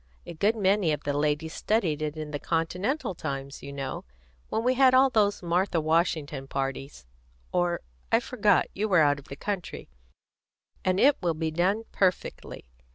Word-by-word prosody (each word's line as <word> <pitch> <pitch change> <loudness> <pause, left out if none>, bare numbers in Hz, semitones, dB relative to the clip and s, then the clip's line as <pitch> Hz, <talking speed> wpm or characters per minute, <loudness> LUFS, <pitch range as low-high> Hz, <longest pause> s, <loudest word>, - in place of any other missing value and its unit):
A 170 - -7
good 205 +7 +1
many 195 -4 +2
of 150 - -2
the 145 - -1
ladies 150 +2 0
studied 175 -9 0
it 155 0 -3
in 155 -1 -5
the 145 - -3
Continental 180 - -1
times, 140 -4 -5
you 140 - -8
know, 135 -1 -5 0.5
when 225 - -1
we 250 +1 +3
had 260 0 +5
all 265 +1 +5
those 205 -4 +2
Martha 175 +1 +1
Washington 155 -4 0
parties 135 - -4 0.5
or, 175 -1 0 0.3
I - - +5
forgot - - +2
you 215 +3 -2
were 180 -4 +5
out 145 -1 +3
of 140 - -15
the 140 - -8
country 195 +3 -5 0.9
and 185 0 +1
it 285 +1 +5
will 170 -2 0
be 160 0 -2
done 185 +7 +1
perfectly. 185 - -1
170 Hz, 170 wpm, -27 LUFS, 150-200 Hz, 0.9 s, had